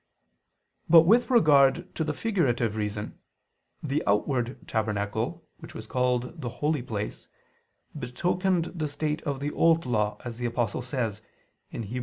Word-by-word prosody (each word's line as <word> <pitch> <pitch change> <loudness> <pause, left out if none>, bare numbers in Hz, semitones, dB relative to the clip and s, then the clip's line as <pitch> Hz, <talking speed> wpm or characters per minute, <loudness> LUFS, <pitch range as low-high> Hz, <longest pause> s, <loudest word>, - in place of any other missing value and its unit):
But 165 0 +9
with 230 +10 +4
regard 160 - +4
to 160 - -1
the 155 -1 -2
figurative 125 - 0
reason, 105 -1 -4 0.6
the 145 0 0
outward 120 +4 0
tabernacle, 110 +8 -2
which - - -11
was 110 - -7
called 125 +6 -1
the 120 - -3
Holy 150 +3 -1
Place, 105 -4 -5 0.7
betokened 175 +6 0
the 160 -4 -2
state 150 +2 -2
of 140 -2 -1
the 145 +1 -2
Old 165 0 +3
Law, 105 -4 0
as 120 -1 -6
the 120 - -1
Apostle 120 -1 -1
says 120 -5 -3 0.5
(Heb. 115 - -5
130 Hz, 140 wpm, -27 LUFS, 115-160 Hz, 0.7 s, But